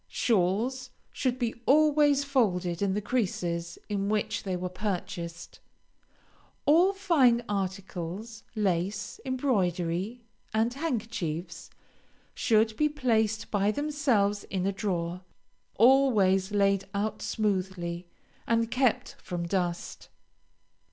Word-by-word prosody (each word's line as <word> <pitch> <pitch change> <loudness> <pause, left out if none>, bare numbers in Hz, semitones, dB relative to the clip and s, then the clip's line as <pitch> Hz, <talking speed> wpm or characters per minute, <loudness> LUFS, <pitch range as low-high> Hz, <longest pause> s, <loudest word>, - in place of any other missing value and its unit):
Shawls 230 +5 0 0.2
should 255 -2 -1
be 240 -3 -1
always 295 -1 +4
folded 190 -11 0
in 195 -1 +1
the 210 - -2
creases 175 -7 -2
in 200 -1 -1
which 210 0 0
they 190 -2 -3
were 180 - -5
purchased. 180 -3 -5 1.1
All 335 +6 +5
fine 295 -12 +3
articles, 195 +2 -4
lace, 195 0 -1
embroidery, 205 - -1 0.3
and 225 +2 +2
handkerchiefs, 215 - -4 0.6
should 220 -1 +2
be 300 0 +3
placed 225 -6 0
by 205 -1 +2
themselves 255 -7 +1
in 190 -1 -2
a 195 - +2
drawer, 180 -3 -2 0.6
always 215 -6 +4
laid 195 -1 +2
out 215 +1 -2
smoothly, 185 -5 -2 0.4
and 230 0 +1
kept 255 -3 +1
from 175 -3 -4
dust. 175 -2 -3
210 Hz, 105 wpm, -28 LUFS, 185-245 Hz, 1.1 s, All